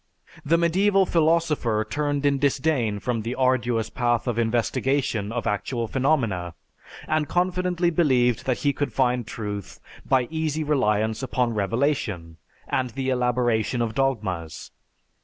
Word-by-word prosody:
The 165 +2 +3
medieval 190 +4 +3
philosopher 155 -10 +1
turned 145 +2 -1
in 140 -1 +2
disdain 135 -6 +1
from 115 +2 -2
the 115 +3 -4
arduous 125 -3 +1
path 120 -1 0
of 120 -2 -1
investigation 115 -1 0
of 120 -1 -3
actual 115 +3 -2
phenomena 115 - 0 0.5
and 155 -1 0
confidently 180 -1 +1
believed 130 -8 +2
that 130 - 0
he 140 - +3
could 145 - -3
find 125 -3 +1
truth 105 -4 -6 0.2
by 130 -2 +2
easy 160 -1 -1
reliance 110 -7 +1
upon 125 -2 0
revelation 105 - -1 0.3
and 130 -1 -1
the 130 +2 -3
elaboration 125 -1 +1
of 115 -2 -1
dogmas. 100 - -2
125 Hz, 130 wpm, -24 LUFS, 110-145 Hz, 0.5 s, The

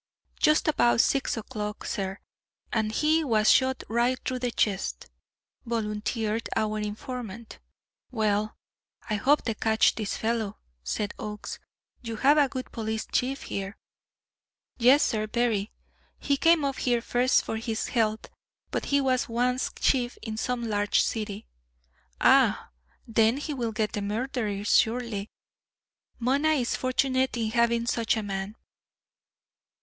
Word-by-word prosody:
"Just 305 0 +3
about 240 -6 +3
six 270 0 +2
o'clock, 210 -2 -5
sir 195 -2 -3 0.6
and 220 -2 +1
he 310 +7 +2
was 220 -6 +4
shot 260 0 +2
right 240 +3 +1
through 255 -1 -2
the 245 0 -1
chest," 195 - -1 0.6
volunteered 220 0 -2
our 215 -1 0
informant. 220 +1 -6 0.5
"Well, 215 -3 0 0.5
I 215 - -2
hope 285 +8 +3
they 225 - -1
catch 220 0 +3
this 215 -3 -3
fellow," 220 -2 -1 0.3
said 205 - -2
Oakes. 210 -1 -6 0.4
"You 230 -2 -5
have 285 +7 +4
a 285 -2 +4
good 255 -1 -6
police 220 -1 -3
chief 270 +2 0
here." 195 +1 -5 1.0
"Yes, 255 +5 +6
sir, 215 -1 0
very. 220 -3 0 0.5
He 285 - 0
came 325 +1 +4
up 275 -1 -2
here 240 -2 +1
first 245 +2 +2
for 220 - -3
his 225 -1 -3
health; 220 -2 0 0.5
but - - -2
he 280 - +2
was 255 -2 +1
once 250 +2 0
chief 245 -2 +1
in 220 -2 -4
some 245 +2 -2
large 205 -1 +2
city." 215 -1 -3 0.7
"Ah, - - +4 0.4
then 225 +2 +3
he 295 +1 -4
will 240 -4 -2
get 215 -1 -1
the 205 - -3
murderer 215 -1 -2
surely. 225 -2 +1 0.9
Mona 280 +6 +2
is 250 -6 0
fortunate 260 0 0
in 220 -2 -1
having 235 0 +2
such 230 -2 +1
a 220 - -2
man." 195 +1 -4
230 Hz, 135 wpm, -27 LUFS, 215-255 Hz, 1.0 s, Yes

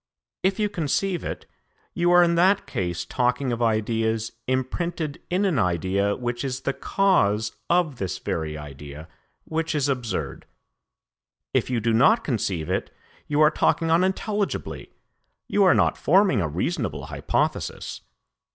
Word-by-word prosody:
If 190 +1 +1
you 210 -1 +1
conceive 180 0 -1
it, - - -5 0.5
you 175 0 +1
are 175 0 +7
in 170 0 +3
that 185 +4 +3
case 85 -2 -3
talking 125 +5 0
of 120 0 -2
ideas 110 0 0 0.2
imprinted 150 +5 -2
in 185 +3 +1
an 175 -10 +1
idea 95 +2 +1
which 120 0 -3
is 135 -1 -3
the 140 - -1
cause 110 - +1
of 170 -6 +2
this 95 -4 -2
very 75 -2 -3
idea, 75 +1 -9 0.4
which 160 0 -2
is 145 -2 +1
absurd. 125 -5 -3 1.1
If - - +1
you 125 -2 0
do 115 +1 +1
not 140 - +5
conceive 95 - -2
it, - - -2 0.4
you 150 +1 +1
are 155 0 +6
talking 165 0 +1
unintelligibly, 190 +4 -1 0.6
you 205 - +3
are 185 - +6
not - - +2
forming 185 - +4
a 85 - 0
reasonable 75 - -2
hypothesis.' - - -2
130 Hz, 140 wpm, -24 LUFS, 105-175 Hz, 1.1 s, are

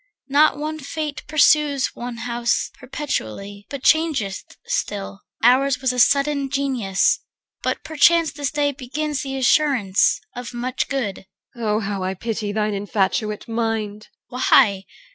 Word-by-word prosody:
Not 290 +1 +4
one 310 +1 -4
fate 300 +1 -4
pursues 300 -2 +3
One 240 -1 -6
house 240 0 0
perpetually, 205 - -5
but 280 -2 -7
changeth 295 -12 +1
still. 205 - -3 0.2
Ours 255 +2 +4
was 260 -2 0
a 250 - -2
sullen 280 +2 +3
Genius, 260 -9 +1 0.4
but - - -2
perchance 320 +1 +4
This 285 -3 -3
day 290 -1 0
begins 285 +2 -3
the 270 -1 -4
assurance 255 -7 +3 0.2
of 245 0 -7
much 250 +2 -2
good. 215 -8 -3 0.3
EL. 235 -2 -4
Oh 210 0 +2
how 200 -1 -3
I 185 +1 -2
pity 215 0 -3
thine 210 0 -1
infatuate 205 +1 -1
mind! 225 -2 -2
CHR. - - -45 0.2
Why? 200 -8 +4
250 Hz, 140 wpm, -22 LUFS, 210-285 Hz, 0.4 s, Not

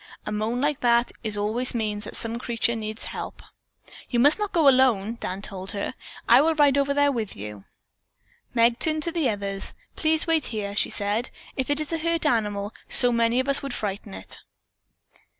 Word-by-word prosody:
A - - -4
moan 215 +3 -1
like 290 +1 0
that 235 0 +3 0.3
always 225 +5 -1
means 210 -2 -2
that - - -8
some 230 +1 -3
creature 235 -1 0
needs 215 0 -5
help." - - -7 0.7
"You 240 - +1
must 290 - +5
not 420 -1 -2
go 320 -4 +3
alone," 240 -5 +4
Dan 190 +2 -4
told 190 -1 -6
her. 200 - -3 0.3
"I 240 +3 +8
will 320 +2 +2
ride 290 -2 +4
over 280 0 +2
there 285 0 +3
with 225 -6 -3
you." 105 -1 -8 0.9
Meg 235 +1 +4
turned 310 -1 +1
to 335 - -1
the 325 -5 +1
others. 200 -2 -3 0.2
"Please 315 0 +2
wait 325 -4 +1
here," 205 -3 -4
she - - +2
said. 210 +4 -1 0.3
"If 260 0 -2
it 290 +1 +1
is 305 +1 -3
a 325 - 0
hurt 335 0 0
animal, 210 -6 0 0.2
so 245 -1 +6
many 235 +1 +2
of 260 - -1
us 275 0 +3
would 275 -3 -5
frighten 200 - -4
it." 95 - -7
235 Hz, 190 wpm, -25 LUFS, 210-285 Hz, 0.9 s, I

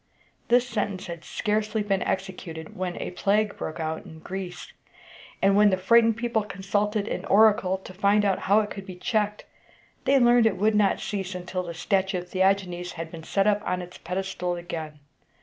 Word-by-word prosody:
This 245 +1 +4
sentence 205 -4 -2
had 170 -1 -7
scarcely 215 0 -1
been 195 -2 0
executed, 180 -4 -4
when 180 -1 -3
a - - -4
plague 205 +3 +1
broke 155 - -5
out 160 0 -3
in 160 - -12
Greece; 180 +2 -7 0.7
and 195 0 +5
when 210 0 +6
the 190 - +1
frightened 225 +4 +4
people 235 -2 0
consulted 205 +1 -1
an - - -3
oracle 205 -3 +4
to 190 -1 -12
find 200 +2 +3
out 195 -2 +2
how 210 +2 +6
it 210 - -5
could 195 0 -7
be 185 - -7
checked, 210 +2 -1 0.6
they 275 - +5
learned 240 -2 +5
that 220 - +4
it - - -9
would 215 +3 +2
not 210 -2 +3
cease 195 -2 -4
until 180 +1 -3
the 170 -2 -7
statue 190 +2 0
of 180 0 -7
Theagenes 185 -2 0
had 165 -1 -6
been 165 - -8
set 195 +4 0
up 210 0 +3
on 180 - -1
its 180 0 -9
pedestal 180 0 -3
again. 165 -3 -6
195 Hz, 190 wpm, -26 LUFS, 180-210 Hz, 0.7 s, when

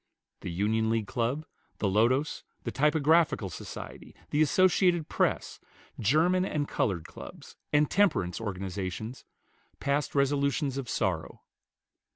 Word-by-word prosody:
The - - -6
Union 110 +5 +1
League 115 -1 +1
Club, 125 +8 -1 0.3
the 100 - 0
Lotos, 120 +9 +2 0.2
the 115 - -3
Typographical 150 - +3
Society, - - -9 0.2
the 150 - +2
Associated 180 0 +3
Press, - - 0 0.4
German 160 - +3
and 150 -6 -1
colored 85 -6 -1
clubs, - - -11 0.2
and 145 0 +4
temperance 135 - +1
organizations 100 +3 -5 0.5
passed 140 +1 -1
resolutions 140 -1 +1
of 125 -4 -6
sorrow. 90 -7 -2
135 Hz, 115 wpm, -29 LUFS, 105-150 Hz, 0.5 s, and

